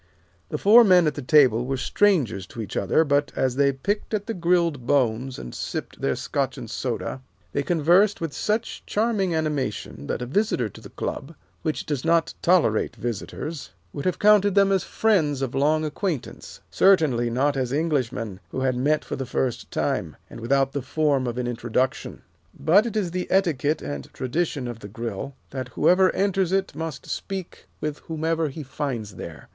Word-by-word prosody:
The 150 - -2
four 220 +8 +7
men 180 -5 +6
at 150 - +1
the 145 - -6
table 130 -4 +5
were 135 0 -1
strangers 130 - +1
to 115 - -11
each 110 - -5
other, 100 +11 +3
but 145 -1 +1
as 130 -2 0
they 140 0 +3
picked 205 +11 -2
at 205 -1 -3
the 225 - -3
grilled 170 - +1
bones, 130 -1 +1
and - - -8
sipped - - -5
their 70 - +1
Scotch - - -2
and - - -7
soda, 130 - -3 0.3
they 140 - 0
conversed 175 +6 +3
with 165 -4 -4
such 215 +2 -2
charming 205 -5 +1
animation 140 - -3
that - - -2
a - - -3
visitor 135 - 0
to - - -14
the - - -11
Club, 155 +5 -5 0.3
which 155 -6 -2
does 145 -4 -2
not 165 0 +2
tolerate 165 -12 +2
visitors, 120 - -5 0.2
would 140 - -5
have 185 - +1
counted 205 -1 +5
them 200 -1 +5
as 190 -1 +2
friends 155 -11 +1
of 130 - -3
long 155 +3 +2
acquaintance, 155 - -4
certainly 150 -11 +4
not 140 +5 +1
as 130 -2 -1
Englishmen 130 - -1
who 130 - -4
had 130 -1 +1
met 145 +5 +1
for - - -4
the 135 - -5
first 125 -1 -2
time, - - -2 0.2
and - - -9
without 135 +3 +1
the 140 - -3
form 140 -1 +1
of 120 0 -3
an 125 - -1
introduction. 120 +1 -2 0.4
But 185 +10 +4
it 220 - -3
is 185 -5 -1
the 180 0 -3
etiquette 160 -6 +1
and 70 -1 -6
tradition 135 0 -2
of 120 -2 -6
the 100 - -9
Grill, 115 +5 -5 0.2
that 130 -2 -4
whoever 185 +9 +3
enters 195 -2 +1
it 195 0 0
must 160 -4 -5
speak 190 -3 -6
with 150 -1 -3
whomever 160 0 -1
he 150 +3 -7
finds 125 -6 -4
there. - - -9
145 Hz, 185 wpm, -24 LUFS, 125-175 Hz, 0.4 s, four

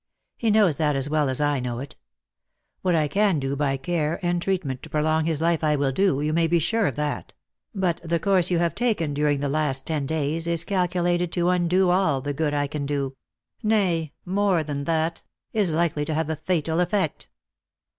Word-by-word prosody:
He 230 - 0
knows 205 -8 +4
that 150 -2 +1
as 135 +2 0
well 150 -3 +2
as 130 - -2
I 145 -2 +1
know 125 -1 -3
it. 135 +3 -7 0.9
What 180 -2 +2
I 155 -2 +2
can 195 +2 +2
do 135 0 -2
by 140 -1 0
care 155 +3 -1
and 175 0 +1
treatment 170 -9 -2
to - - -10
prolong 155 +1 +1
his 160 -2 -1
life 165 -1 +1
I 150 -1 +3
will 140 -1 +1
do, 145 -2 +1
you 155 +1 0
may 165 0 +3
be 170 - +1
very - - +2
sure 200 +7 +1
of 135 - -2
that; 150 -1 -3 0.4
but 180 -3 0
the 170 0 0
course 185 0 +2
you 175 - +2
have 170 0 +1
taken 205 -12 0
during 145 -1 +1
the 145 - 0
last 140 -2 -1
ten 150 -4 -2
days 160 +2 -1
is 170 -1 0
calculated 175 -2 0
to 175 0 +1
undo 180 +1 +2
all 175 -7 +2
the 145 +2 -3
good 150 +1 0
I 145 0 +1
can 145 0 -4
do 140 -2 -2 0.2
— 115 - -49
nay, 185 -8 +1
more 190 -2 +1
than 140 -2 -4
that, 165 +1 0 0.3
is 205 -6 +1
likely 160 -2 0
to 155 - -2
have 160 0 -1
a - - -1
fatal 160 0 -1
effect." 180 -2 -1
160 Hz, 215 wpm, -24 LUFS, 145-175 Hz, 0.9 s, knows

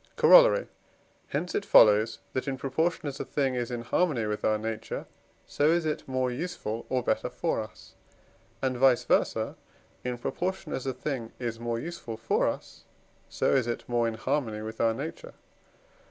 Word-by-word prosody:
Corollary. - - +7 0.6
Hence - - -3
it 410 - 0
follows, 110 +1 +6 0.2
that, 130 - -2
in 135 -1 -2
proportion 160 +6 -1
as 140 -2 -4
a - - -1
thing 135 -3 0
is 120 -2 -2
in 120 -1 -4
harmony 135 -2 +1
with 105 0 -3
our 110 - +3
nature, 110 0 -4 0.4
so 145 - +1
is 170 0 +2
it 155 -1 -2
more 130 -1 0
useful 125 -6 -4
or 130 -1 0
better - - 0
for - - -1
us, - - -12 0.7
and 130 -1 +1
vice 130 -2 +4
versâ, - - +1 0.5
in 125 -1 -3
proportion 185 +9 -3
as 135 - -3
a 130 - 0
thing 125 -5 -4
is 115 -2 -4
more 115 0 -2
useful 150 -7 -6
for 115 +1 +1
us, - - -5 0.4
so - - +1
is 130 -3 +2
it 120 - -4
more 120 -1 +1
in 115 - -2
harmony 110 -3 -2
with 110 +1 -5
our 115 -1 +3
nature. 165 - -7
125 Hz, 175 wpm, -28 LUFS, 115-150 Hz, 0.7 s, Corollary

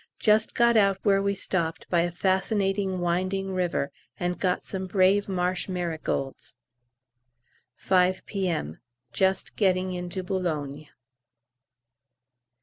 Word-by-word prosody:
Just 215 0 +2
got 235 -1 +4
out 195 -2 +4
where 195 -2 +4
we 200 0 0
stopped 170 -4 -2
by 170 -2 +4
a 175 - 0
fascinating 190 +1 0
winding 185 +2 -1
river, 175 -6 -1 0.3
and 175 0 -2
got 180 -1 0
some 190 -1 -4
brave 195 +2 +3
marsh 180 0 -1
marigolds. 165 -6 -3 1.2
5 185 +3 +2
P.M. 175 - -2 0.3
Just 190 0 0
getting 185 -2 +1
into 180 +1 -4
Boulogne. 155 -6 -3
185 Hz, 110 wpm, -26 LUFS, 175-195 Hz, 1.2 s, got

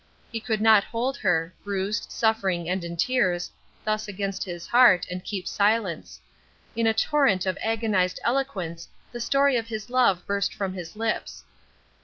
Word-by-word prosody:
He 230 - -3
could 220 -1 -2
not 220 -2 +6
hold 245 +5 -2
her 165 +1 0
bruised, 200 +1 -2
suffering, 195 -7 0
and 180 0 -1
in 170 0 -6
tears 180 -4 +1 0.3
thus 215 0 -1
against 195 -1 -3
his 175 -3 -7
heart, 240 -7 +5
and 180 0 -5
keep 195 -4 -5
silence. 205 -4 0 0.6
In 230 0 +1
a 225 - +4
torrent 225 -8 +2
of 185 -1 0
agonized 215 -5 0
eloquence 195 -11 -2 0.2
the 240 - -6
story 275 +1 +3
of 230 -1 -3
his 220 +1 -6
love 240 -9 +3
burst 200 0 -1
from 195 -2 -3
his 175 -2 -8
lips. 225 0 -3
205 Hz, 160 wpm, -25 LUFS, 185-230 Hz, 0.6 s, not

